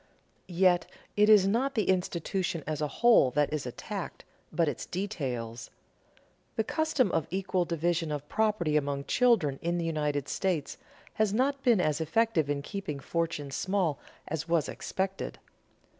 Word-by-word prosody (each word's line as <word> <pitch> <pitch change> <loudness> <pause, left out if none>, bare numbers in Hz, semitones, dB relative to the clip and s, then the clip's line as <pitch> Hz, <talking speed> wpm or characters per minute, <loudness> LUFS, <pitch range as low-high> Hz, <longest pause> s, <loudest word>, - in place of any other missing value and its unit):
Yet, 175 -1 +3 0.3
it 210 +1 +4
is 210 -3 +7
not 255 +7 +1
the 215 -4 +1
institution 180 -2 -1
as 155 -1 -3
a 150 - +1
whole 235 - +5
that 150 0 +2
is 145 -4 -2
attacked, 125 - -6 0.3
but 170 -2 +1
its 145 - -3
details. 130 - -4 0.9
The 220 - +1
custom 295 - +1
of 165 -3 0
equal 185 -1 0
division 170 -1 0
of 145 0 -4
property 210 -8 +1
among 140 -1 0
children 190 - +2
in 170 +1 0
the 170 - -1
United 150 -3 -1
States 180 -7 -2 0.3
has 215 -1 +1
not 275 +3 +1
been 235 -6 +4
as 155 -2 +1
effective 165 -2 +1
in 145 -1 -1
keeping 190 -5 -5
fortunes 150 -2 -2
small 185 -3 0 0.3
as 160 +1 -4
was 165 -3 +2
expected. 190 0 -3
170 Hz, 150 wpm, -29 LUFS, 150-200 Hz, 0.9 s, is